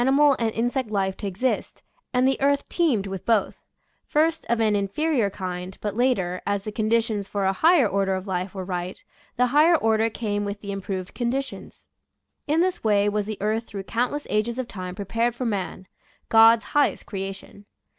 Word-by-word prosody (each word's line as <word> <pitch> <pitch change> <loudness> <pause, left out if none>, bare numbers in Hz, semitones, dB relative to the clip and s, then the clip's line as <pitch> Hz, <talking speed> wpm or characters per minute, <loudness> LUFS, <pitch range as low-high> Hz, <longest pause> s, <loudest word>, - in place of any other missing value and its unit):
mal 275 +2 +5
and 230 -1 +1
insect 245 +1 -1
life 195 -2 0
to 205 - -5
exist, 205 +7 -2 0.3
and 250 +1 +3
the 270 - 0
earth 280 0 +2
teemed 280 - +1
with 190 -1 -5
both; 225 -2 +1 0.5
first 320 +2 +1
of 235 -1 +2
an 215 -2 +3
inferior 220 +4 0
kind, 185 -1 -6
but 210 -1 -3
later, 200 -8 +1
as 200 -1 -1
the 215 - -5
conditions 215 -1 0
for 200 -1 -2
a 190 - +2
higher 315 - +4
order 195 -1 0
of 185 0 -5
life 185 0 -3
were 190 -1 -4
right, 180 0 -4 0.3
the 250 - +3
higher 315 +4 +6
order 225 -2 +2
came 205 -2 -2
with 200 0 -4
the 200 - -5
improved 190 -2 -5
conditions. 260 +3 -4 0.6
In 310 +3 +2
this 365 0 0
way 205 -2 +3
was 210 0 -1
the 215 -1 -4
earth 220 +2 -1
through 200 -2 -6
countless 250 +8 -2
ages 215 +3 0
of 255 -2 -3
time 185 -4 -6
prepared 230 +4 -1
for 250 - -4
man 195 -3 -3 0.2
— - - -36
God's 225 0 +7
highest 290 -1 +2
creation. 195 +1 -7
215 Hz, 185 wpm, -24 LUFS, 195-250 Hz, 0.6 s, God's